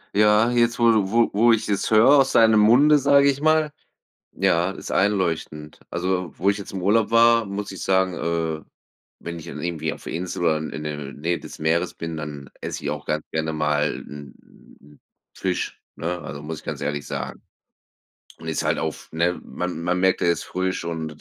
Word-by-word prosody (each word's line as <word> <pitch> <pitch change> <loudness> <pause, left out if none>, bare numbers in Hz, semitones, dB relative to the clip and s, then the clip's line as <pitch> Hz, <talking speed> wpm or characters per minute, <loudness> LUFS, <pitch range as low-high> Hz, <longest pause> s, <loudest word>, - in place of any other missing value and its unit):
Ja, 105 +3 +4
jetzt, 120 -1 +2
wo 115 -1 +5
du 100 -4 +2
wo 115 0 +3
wo 115 +3 +5
ich 110 -1 -1
es 100 - 0
höre 110 +3 +5
aus 135 - +2
deinem 110 -2 +6
Munde, 140 +8 +6
sage 140 +1 +5
ich 140 +2 -7
mal. 155 -1 +3 0.6
Ja, 85 +3 +1
ist - - -9
einleuchtend. 85 -6 -1
Also, 90 -1 -2
wo 100 +3 +2
ich 100 - -2
jetzt 100 - -8
im 95 -2 -5
Urlaub 110 +3 +2
war, 115 0 +5
muss 100 +1 -5
ich 95 - -8
sagen, 95 -1 +2
äh, 80 -2 -2 0.6
wenn 85 0 -6
ich 80 - -10
dann - - -7
irgendwie 85 -2 -2
auf - - -10
der - - -6
Insel 85 +1 -4
war, 80 -2 +2
in 80 - -5
in 75 +2 -6
der 75 -1 -4 0.2
Nähe 85 +4 -2
des - - -11
Meeres 85 +3 0
bin, 80 -1 -6
dann 75 -2 -7
esse - - -5
ich 70 - -2
auch 75 -1 -6
ganz 75 0 -1
gerne 80 0 -2
mal 75 -1 0
'n 75 0 -15 0.4
Fisch, 90 -2 -3
ne? 90 +2 -4
Also, 70 -1 -8
muss 80 0 -6
ich - - -14
ganz - - -5
ehrlich 75 -1 -3
sagen. - - -5 1.0
Und 80 - -11
ist 80 - -1
halt - - +1
auch - - -1
f - - -15
ne, 85 +2 0
man 90 -2 -5
man 90 +1 0
merkt 95 0 +2
er 85 - +3
ist - - -3
frisch 95 -1 -3
und 80 -2 -3
90 Hz, 205 wpm, -23 LUFS, 80-105 Hz, 1.0 s, deinem